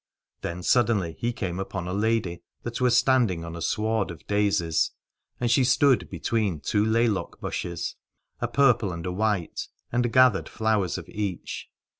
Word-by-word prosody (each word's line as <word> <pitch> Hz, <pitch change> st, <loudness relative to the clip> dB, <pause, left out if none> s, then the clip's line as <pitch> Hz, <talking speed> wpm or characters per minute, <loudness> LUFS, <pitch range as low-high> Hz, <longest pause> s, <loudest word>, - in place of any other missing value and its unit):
Then 85 Hz, +1 st, -4 dB
suddenly 105 Hz, -9 st, +2 dB
he 120 Hz, -, 0 dB
came 95 Hz, -6 st, -4 dB
upon 95 Hz, -2 st, -4 dB
a 90 Hz, -, -3 dB
lady 105 Hz, -4 st, 0 dB, 0.2 s
that 120 Hz, +1 st, -4 dB
was 125 Hz, -1 st, +4 dB
standing 115 Hz, -12 st, +2 dB
on 85 Hz, 0 st, -7 dB
a 85 Hz, -, -7 dB
sward 110 Hz, +5 st, 0 dB
of 85 Hz, -, -9 dB
daisies, 100 Hz, -6 st, +1 dB, 0.5 s
and 120 Hz, -1 st, +1 dB
she 130 Hz, +2 st, +4 dB
stood 130 Hz, +1 st, +3 dB
between 105 Hz, -8 st, -1 dB
two 105 Hz, +9 st, +1 dB
laylock 110 Hz, -1 st, +1 dB
bushes, 85 Hz, -1 st, -4 dB, 0.4 s
a 120 Hz, -, -1 dB
purple 120 Hz, -5 st, +3 dB
and 85 Hz, -1 st, -6 dB
a 90 Hz, -, -2 dB
white, 100 Hz, -2 st, -1 dB, 0.2 s
and 120 Hz, 0 st, +1 dB
gathered 130 Hz, -5 st, +4 dB
flowers 110 Hz, -5 st, 0 dB
of -, -, -8 dB
each. 100 Hz, -4 st, -4 dB
105 Hz, 160 wpm, -26 LUFS, 90-120 Hz, 0.5 s, was